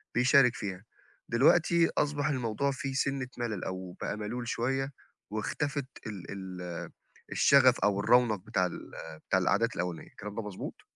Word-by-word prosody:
بيشارك 125 0 +5
فيها. 95 -2 -5 0.5
دلوقتي 165 +7 +4
أصبح 145 0 +1
الموضوع 130 -1 0
فيه 135 0 -4
سِنّة 135 -1 0
مَلَل 110 -6 -3
أو 95 -1 -5
بقى 105 - -2
مَلول 120 +3 -4
شوية 135 +4 -1 0.4
واختفت 140 +6 -2 0.2
ال 100 -5 -7
ال 90 -3 -6 0.4
الشَغَف 130 -3 +5
أو 100 -1 +2
الرَّونَق 120 +1 +4
بتاع 95 0 0
ال 90 - -6 0.4
بتاع 95 - +4
القعدات 110 +5 +1
الأولانية، 90 -2 -3
الكلام 105 0 -8
ده 115 - -2
مضبوط؟ 105 -3 -7
115 Hz, 140 wpm, -30 LUFS, 100-135 Hz, 0.5 s, بيشارك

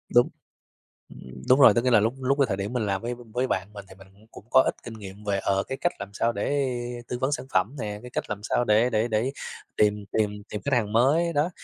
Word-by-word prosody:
Đúng, 120 0 +6 0.8
ừm, 65 0 -12
đúng 130 +2 +6
rồi, 115 -6 +8
có 120 - +3
nghĩa 125 - +1
là 115 -3 +6
lúc 115 +5 +1
lúc 135 +2 +1
cái 140 - +5
thời 100 - -2
điểm 100 +3 -4
mình 120 -4 -1
làm 95 0 -1
với 120 +1 -3 0.2
với 125 +1 +1
bạn 95 -1 -2
mình 100 -1 -9
thì - - -13
mình 95 0 -16
cũng 105 +2 -22
cũng - - -13
có 130 - +7
ít - - -1
kinh 120 - -7
nghiệm 105 -1 -10
về, 100 -1 0
ờ, 95 0 +1
cái 135 - -5
cách 175 - +1
làm 100 0 -7
sao 115 +3 0
để 140 +6 0 0.4
tư 125 - -3
vấn 130 +2 0
sản 135 - -2
phẩm 100 +10 +1
nè, 105 -2 -4
cái 125 - -9
cách - - -2
làm 105 -1 -3
sao 120 - +1
để 115 +2 +3
để 110 0 +1
để 110 +3 0 0.5
tìm 105 -1 +2
tìm 105 -1 -1
tìm 105 - -5
khách 140 -2 +1
hàng 105 -3 0
mới 150 +9 +3
đó. 150 +3 +1
110 Hz, 270 wpm, -26 LUFS, 100-130 Hz, 0.8 s, rồi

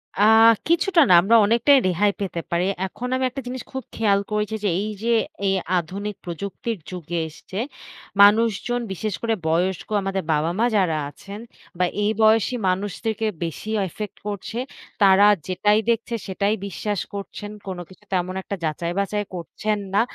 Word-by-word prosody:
আ - - -1 0.5
কিছুটা 340 +1 +3
না - - +7
আমরা 225 +5 +3
অনেকটাই 235 +6 +5
রেহাই 200 +3 +2
পেতে 175 -3 -3
পারি। 175 +2 +1 0.2
এখন 240 +6 -6
আমি 260 - 0
একটা 270 +2 -6
জিনিস 255 0 -5
খুব 265 -1 -5
খেয়াল 205 -3 +3
করেছি 210 +1 -1
যে, 205 - +2
এই 215 - -3
যে 235 - +2 0.3
এই 195 - +2 0.2
আধুনিক 195 +4 -4
প্রযুক্তির 200 +6 -4
যুগে 175 -2 -4
এসছে 185 +5 -10 0.6
মানুষজন, 225 +3 +4
বিশেষ 205 +3 -3
করে 230 -1 +1
বয়স্ক 175 +3 0
আমাদের 195 -1 -2
বাবা 155 +3 +1
মা 235 - +4
যারা 180 -6 +2
আছেন 200 +7 -10 0.4
বা 180 - +3 0.2
এই 210 - +2
বয়সী 220 +3 +4
মানুষদেরকে 205 +4 -2 0.2
বেশি 165 +6 -5 0.2
ইফেক্ট 205 +3 -7
করছে। 210 +3 -5 0.5
তারা 195 +1 +7 0.2
যেটাই 210 +3 +2
দেখছে 235 +1 0
সেটাই 200 +2 0
বিশ্বাস 205 +1 -3
করছেন। 205 +1 -6 0.2
কোন 190 -1 -4
কিছু 190 +2 -17
তেমন 185 0 0
একটা 200 - -4 0.4
যাচাই-বাছাই 205 +1 -1
করছেন 210 +5 -3 0.2
না। 205 - +4
205 Hz, 155 wpm, -23 LUFS, 185-220 Hz, 0.6 s, না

